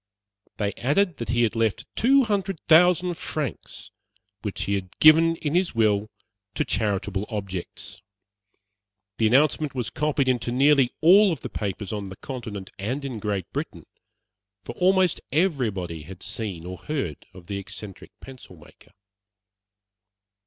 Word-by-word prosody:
They 100 -2 -1
added 160 +8 +1
that 115 -3 -6
he 120 0 +2
had 115 0 0
left 115 -2 0
two 270 +3 +4
hundred 195 -5 -1
thousand 180 +2 +4
francs, 150 -7 -5 0.5
which - - -4
he 100 - -1
had 95 -2 -4
given 165 +2 +6
in 150 -2 -3
his 180 -4 +1
will 105 -2 +2 0.5
to - - 0
charitable 105 -1 -1
objects. 95 -2 -6 1.2
The 110 - +4
announcement 145 +3 +2
was 125 -3 -3
copied 145 -2 0
into 120 -2 0
nearly 135 0 +4
all 185 +3 +6
the - - -8
papers 100 0 -4
on 100 -2 -4
the 95 - -8
Continent 110 -6 -7
and 130 +8 -3
in 125 -5 -5
Great 100 -4 -2
Britain, - - -5 0.8
for - - -7
almost 185 -1 +2
everybody 115 - 0
had 90 +5 -11
seen 105 -5 -5
or 90 0 -7
heard 135 - -4
of 90 -2 -12
the 100 +2 -4
eccentric 100 0 -9
pencil 130 -8 -12
maker. 80 +4 -19
120 Hz, 140 wpm, -25 LUFS, 100-155 Hz, 1.2 s, given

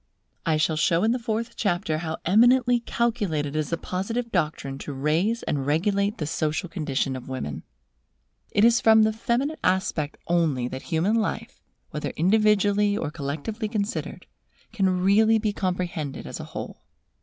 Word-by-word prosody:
I 160 -1 +3
shall 155 0 +1
show 165 +3 +2
in 225 - +3
the 250 - 0
fourth 230 0 -3
chapter 175 -6 0
how 160 -1 -4
eminently 245 +5 +5
calculated 205 -12 -1
is 155 -2 -1
the 170 - -1
Positive 225 +8 -3
doctrine 150 -6 -2
to 145 - -6
raise 160 - 0
and 140 -2 -1
regulate 200 +7 +1
the 155 - -3
social 155 +3 -1
condition 145 -6 -2
of 130 0 -8
women. 125 - -4 0.9
It 205 - +3
is 235 0 +4
from 220 -1 +6
the 215 0 +2
feminine 260 +7 -1
aspect 170 -5 0
only 160 -8 +1
that 130 +1 -6
human 170 +6 0
life, 225 -1 -2 0.3
whether - - -3
individually 205 +2 +3
or 150 - -3
collectively 155 +10 -4
considered, 210 -1 -3 0.5
can 190 -4 +1
really 220 +3 +5
be 215 -1 -1
comprehended 180 -7 -3
as - - -7
a - - -6
whole. - - -7
190 Hz, 155 wpm, -25 LUFS, 155-220 Hz, 0.9 s, from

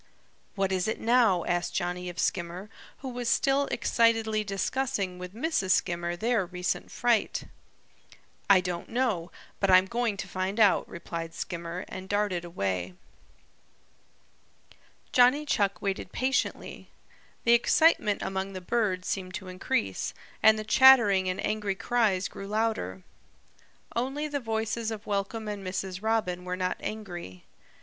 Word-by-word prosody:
"What 195 -2 0
is 185 0 0
it 220 - -2
now?" 225 -7 +3
asked 175 0 -1
Johnny 180 +1 -2
of 175 - -9
Skimmer, 175 +4 -2 0.3
who 265 - -5
was 245 -1 -3
still 275 +2 +2
excitedly 225 -1 +2
discussing 195 -2 -2
with 180 +2 -8
Mrs. 230 - +1
Skimmer 175 -2 -1
their 225 +2 +1
recent 180 0 -3
fright. 240 -3 +1 1.1
"I 195 -2 +7
don't 175 -1 -4
know, 225 -9 -1 0.3
but 195 - +1
I'm 185 0 +7
going 235 0 -1
to - - -5
find 190 +3 -3
out," 210 -3 +4
replied 165 -1 -6
Skimmer 170 +1 -5
and 185 0 -8
darted 205 -4 0
away. 95 - -3 2.2
Johnny 255 +4 +5
Chuck 200 -9 +1
waited 195 -2 -2
patiently. 265 +2 -2 0.5
The 235 - +5
excitement 235 -2 +3
among 190 0 -3
the 185 - -5
birds 185 -2 -1
seemed 185 -2 -3
to 190 -3 -7
increase, 105 - -2 0.3
and 220 0 +6
the 215 - -3
chattering 215 -6 +6
and 185 - -3
angry 210 -2 -1
cries 205 -4 +1
grew 195 - -9
louder. 210 - -1 0.9
Only 270 +5 -1
the 290 -1 -2
voices 225 -1 -2
of 220 -1 -6
Welcome 205 +2 -2
and 205 -2 -5
Mrs. 185 0 -4
Robin 215 -5 0
were 180 0 -3
not 185 0 -1
angry. 175 - -7
195 Hz, 140 wpm, -28 LUFS, 180-225 Hz, 2.2 s, I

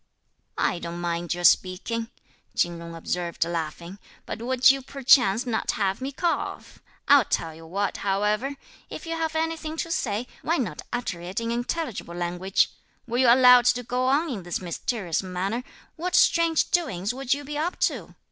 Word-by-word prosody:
"I 175 - +1
don't 170 0 -6
mind 175 0 -2
your 175 - -6
speaking," 220 +6 +2 0.5
Chin 175 -1 +1
Jung 170 0 -8
observed 170 0 -2
laughing; 170 +3 -5 0.3
"but - - -6
would 255 +2 +5
you 275 0 -2
perchance 250 -5 +3
not 235 -3 -1
have 195 +2 -1
me 270 +2 -3
cough? 340 +5 -3 0.3
I'll 280 -2 +7
tell 165 -3 -1
you 160 +1 -13
what, 200 +3 -2
however; 210 +7 0 0.3
if - - -8
you 330 0 -3
have 320 -1 -2
anything 320 0 -2
to 335 0 -3
say, 225 - -1 0.2
why 335 +2 +1
not 190 - -3
utter 235 -8 -3
it 180 +4 -4
in 230 0 -2
intelligible 240 - -3
language? 175 +2 0 0.3
Were 240 0 -2
you 260 - +5
allowed 250 -1 +7
to 245 0 +3
go 250 +2 -1
on 290 +6 +2
in 215 -6 -4
this 175 -1 -3
mysterious 180 +1 -2
manner, 190 +6 -3 0.3
what 360 +3 -2
strange 335 -2 +3
doings 220 - 0
would 270 +1 0
you 290 - -7
be 295 +1 -6
up 325 +5 -2
to? - - -1
230 Hz, 175 wpm, -25 LUFS, 180-275 Hz, 0.5 s, I'll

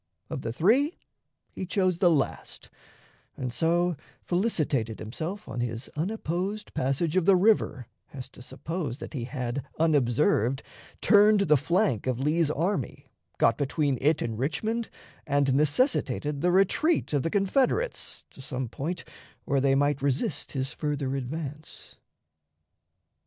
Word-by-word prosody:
Of - - -3
the 115 - -3
three 245 - +2 0.5
he 185 - -6
chose 185 -3 +1
the 180 -3 +5
last, 150 -5 -2 0.7
and 125 -2 -3
so 170 +5 +2 0.3
felicitated 155 - 0
himself 165 - -5
on 120 - -5
his 115 0 -3
unopposed 190 +3 -3
passage 140 +6 0
of 185 -3 +3
the 195 0 +6
river 185 - +2 0.3
as 130 -2 -7
to - - -14
suppose 140 +1 -5
that 155 - -8
he 125 -5 -3
had, 125 0 -3
unobserved, 135 -4 +2 0.4
turned 210 0 +6
the 155 -6 +4
flank 160 - +1
of 125 -2 0
Lee's 155 +3 +2
army, 165 0 -2 0.3
got 115 -1 +3
between 140 -2 0
it 150 +3 +2
and 115 -1 -4
Richmond, 215 - -1 0.4
and 140 -2 +2
necessitated 150 - +1
the 180 +1 +3
retreat 195 - +2
of 145 - +2
the 165 - -1
Confederates 260 - 0
to - - -13
some 130 -2 -4
point 160 +8 -4 0.4
where 140 -1 +1
they 135 0 +3
might 145 0 +1
resist 140 +1 -1
his 135 0 -2
further 145 -3 -2
advance. 145 +3 -6
150 Hz, 135 wpm, -27 LUFS, 130-185 Hz, 0.7 s, the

